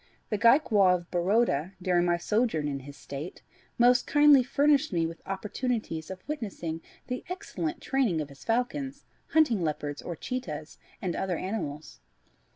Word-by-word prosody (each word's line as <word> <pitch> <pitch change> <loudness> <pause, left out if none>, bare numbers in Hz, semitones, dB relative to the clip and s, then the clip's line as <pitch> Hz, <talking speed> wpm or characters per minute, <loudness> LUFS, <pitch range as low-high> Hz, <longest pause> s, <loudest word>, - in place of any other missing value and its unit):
The 210 - +1
Gaekwar 220 -6 +5
of 175 -1 -7
Baroda, 185 -2 +1
during 180 -1 +2
my 175 -1 +2
sojourn 190 -4 0
in 140 -1 -2
his 140 +1 -11
State, 145 +5 -7 0.3
most 245 +1 +5
kindly 290 -2 +7
furnished 285 +3 +2
me 170 -3 +1
with 165 0 -6
opportunities 205 -4 -3
of 190 +3 -9
witnessing 195 - -4 0.2
the 250 0 -4
excellent 180 - -4
training 255 - +1
of 150 -2 -4
his 140 -1 -14
falcons, 265 +4 -1 0.2
hunting 285 - +3
leopards, 150 -2 -2
or 175 - -5
cheetahs, 160 - -5 0.2
and 180 -3 -1
other 185 -3 -1
animals. 155 - -5
190 Hz, 150 wpm, -28 LUFS, 165-250 Hz, 0.3 s, kindly